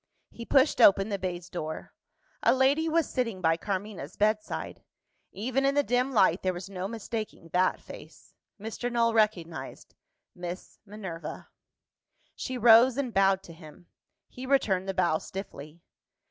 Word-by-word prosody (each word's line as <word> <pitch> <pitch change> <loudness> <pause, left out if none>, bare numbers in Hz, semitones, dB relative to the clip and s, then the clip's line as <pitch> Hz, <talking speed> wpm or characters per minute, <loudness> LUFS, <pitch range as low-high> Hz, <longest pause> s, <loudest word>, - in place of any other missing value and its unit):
He 230 - -9
pushed 270 0 +3
open 195 -1 +6
the 200 -2 -2
baize 180 -1 -4
door. 155 -4 -6 0.5
A - - +4
lady 280 +5 +2
was 325 0 +2
sitting 230 -7 -2
by 165 -2 +2
Carmina's 190 -3 -5
bedside. 215 +1 -1 0.5
Even 255 +7 -2
in 275 +1 +2
the 290 - +3
dim 250 +1 0
light, 190 -6 +3
there 185 -1 -1
was 185 +3 -8
no 185 0 -4
mistaking 220 -5 -6
that 180 +2 +1
face. - - -13 0.3
Mr. 225 +3 -4
Null 230 -1 +2
recognised 170 -10 -1 0.4
Miss 175 +1 -8
Minerva. 190 -6 -8 0.9
She 255 - -4
rose, 235 +2 +6
and 260 -5 -2
bowed 195 0 +3
to 170 - -12
him. 160 +1 -15 0.4
He 255 +1 -9
returned 195 -9 +1
the 190 - -2
bow 170 -4 +2
stiffly. 165 -4 -9
200 Hz, 145 wpm, -28 LUFS, 180-240 Hz, 0.9 s, open